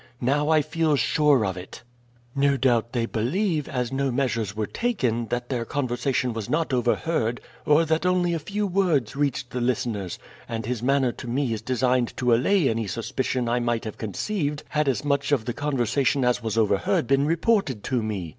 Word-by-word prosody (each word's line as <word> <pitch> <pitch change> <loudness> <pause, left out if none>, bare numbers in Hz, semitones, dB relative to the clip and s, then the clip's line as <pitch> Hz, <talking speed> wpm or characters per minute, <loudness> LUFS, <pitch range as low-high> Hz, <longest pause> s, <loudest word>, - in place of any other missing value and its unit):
Now 145 +4 +1
I 155 -2 +4
feel 155 0 +1
sure 145 -2 +3
of 95 -2 -2
it. 90 +5 -10 0.5
"No 140 0 +2
doubt 120 -3 +2
they 120 -2 0
believe, 150 - -1
as 125 -2 -2
no 135 0 0
measures 120 -6 -1
were 110 0 -1
taken, 120 - -1
that 120 +1 -3
their 125 -3 -1
conversation 125 -1 -1
was 110 -2 -5
not 160 -2 0
overheard 120 0 0 0.3
or 150 +2 +5
that 160 +1 0
only 180 -1 +2
a 165 - -1
few 205 +7 -2
words 175 - +1
reached 140 -3 -1
the 125 - -3
listeners, 115 -6 -1 0.3
and 115 -1 -3
his 120 -1 -2
manner 135 0 +2
to 125 - -9
me 125 0 0
is 110 - -4
designed 125 0 0
to 125 -2 +2
allay 155 +7 +3
any 115 -2 -1
suspicion 120 +3 -2
I 120 +1 +1
might 120 -1 -1
have 110 - -6
conceived 145 - -2
had 150 -1 0
as 135 +2 0
much 140 0 0
of 130 -6 +2
the 120 - -2
conversation 135 0 0
as 125 0 +2
was 110 -1 -3
overheard 105 +1 +2
been 140 +3 +2
reported 165 - +1
to 125 -3 0
me. 105 -5 -3
130 Hz, 190 wpm, -25 LUFS, 115-150 Hz, 0.5 s, or